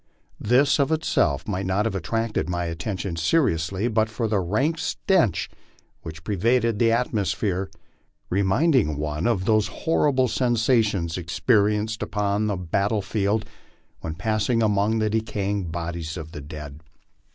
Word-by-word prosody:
This, 135 +6 +3
of 140 +2 +2
itself, 80 - +1
might 95 -2 -2
not 95 +3 +1
have 115 - -1
attracted 110 +4 -2
my 85 -1 -2
at 85 0 -6
tention 95 -2 -3
seriously 95 - +1
but 110 -1 +1
for 110 +1 -2
the 105 -2 +1
rank 130 - 0
stench 120 - +1 0.5
which 80 0 -9
pervaded 115 +3 +1
the 115 -1 +4
atmosphere, 105 -5 0 0.6
re 95 +3 +2
minding 110 - +2
one 75 +5 -2
of 100 -6 0
the 110 +1 +4
horrible 135 +2 +1
sensations 110 -8 +1
experienced 105 +4 +1
upon 105 0 0
a 100 - -1
battle 100 +4 0
field 105 +1 0 0.5
when 80 -1 -5
passing 110 +5 0
among 105 +1 +2
the 110 -1 +1
decaying 105 -3 -1
bodies 85 0 -4
of 80 -1 -7
the 75 - -7
dead. 75 0 -9
105 Hz, 140 wpm, -24 LUFS, 85-115 Hz, 0.6 s, the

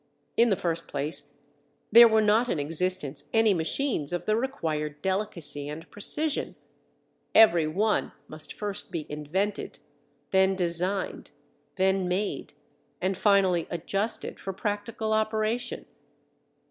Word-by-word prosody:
In 235 +1 +4
the 200 - +3
first 165 -4 -3
place, 145 0 -3 0.6
there 235 +2 +10
were 220 -1 +3
not 220 +4 +3
in - - 0
existence 155 -2 -1
any 225 -2 +4
machines 170 - 0
of 175 - -3
the 215 - +2
required 155 - -2
delicacy 185 -7 -2
and 155 +2 -8
precision; 295 +9 -1 0.8
every 170 -8 +6
one 205 +7 0 0.2
must 155 0 -6
first 205 -1 -5
be 160 -3 -4
invented, 160 +8 -3 0.5
then 190 0 +4
designed, 180 +2 -1 0.5
then 190 -1 +1
made, 190 +3 -2 0.5
and 190 +1 0
finally 190 -4 +3
adjusted 195 +6 -2
for 195 - -5
practical 210 +2 -3
operation. 220 +2 -1
190 Hz, 120 wpm, -27 LUFS, 165-215 Hz, 0.8 s, there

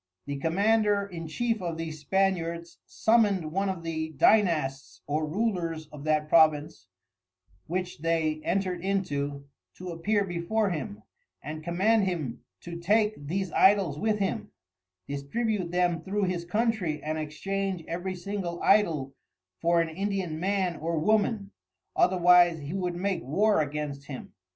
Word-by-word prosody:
The 140 0 -4
Commander 205 +6 +2
in 170 -4 -7
chief 225 +6 -1
of 170 -2 -3
these 160 -1 -5
Spaniards 170 0 -1
summoned 205 -8 +2
one 195 +3 0
of 185 -3 -4
the 160 -1 -3
Dynasts 150 -6 +2
or 155 +1 -1
Rulers 170 -4 -1
of 150 -1 -10
that 155 -1 +1
Province 155 - +3 0.8
which 180 0 -3
they 160 -1 0
entred 185 -1 -1
into, 145 -8 -2 0.3
to 185 0 -7
appear 200 +5 +1
before 190 +4 0
him, 125 -10 -5 0.4
and 155 +2 -6
command 195 +6 +2
him 155 -10 -3 0.2
to 170 -1 -7
take 210 -3 +1
these 190 +3 -2
Idols 190 -7 +4
with 215 0 +1
him, 205 +3 -2 0.6
distribute 185 +7 -2
them 175 -1 +1
through 200 +3 -2
his 180 -2 -1
Countrey 205 -5 0
and 155 +1 -2
exchange 185 +4 -3
every 180 +2 -3
single 180 -1 -4
Idol 160 -10 +3 0.5
for 170 0 +3
an 165 - -1
Indian 190 -2 -2
Man 185 -2 0
or 165 +1 -2
Woman, 205 +3 +1 0.4
otherwise 180 -2 +5
he 145 +1 -6
would 180 -2 -2
make 185 -1 -1
War 200 +6 +2
against 145 -1 -4
him. 135 -3 -8
175 Hz, 140 wpm, -28 LUFS, 155-195 Hz, 0.8 s, otherwise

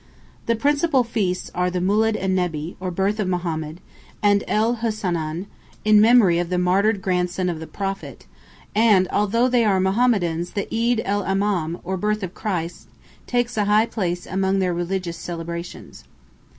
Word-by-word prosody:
The 230 - +2
principal 285 +2 +2
feasts 205 -6 -2
are 180 0 0
the 180 - -3
"Mūled 210 +4 +2
en 190 0 0
Nebbi," 170 -3 -2
or 185 0 -3
birth 195 +4 -1
of 205 - 0
Mohammed, 170 -2 -3 0.4
and 205 -1 +4
"El 225 +3 +1
Hussanên," 180 -7 -2 0.4
in 215 -1 +6
memory 215 -7 +5
of 175 -1 -2
the 180 - 0
martyred 195 +3 +2
grandson 180 0 0
of 165 -3 -3
the 160 - -7
Prophet, 195 -1 -5 0.5
and 210 -4 +4
although 220 +4 +2
they 245 -2 +3
are 200 -3 +2
Mohammedans 190 -4 +1
the 200 - -2
"Eed 230 0 +1
el 205 +1 0
Imam," 190 -4 0
or 190 +2 -3
birth 210 +2 -1
of 185 -1 -5
Christ, 175 -5 -4 0.4
takes 245 -1 -1
a 210 - +2
high 210 +2 +4
place 180 -6 -3
among 190 +1 0
their 185 -2 +1
religious 175 0 -3
celebrations. 170 0 -7
190 Hz, 165 wpm, -22 LUFS, 175-215 Hz, 0.5 s, in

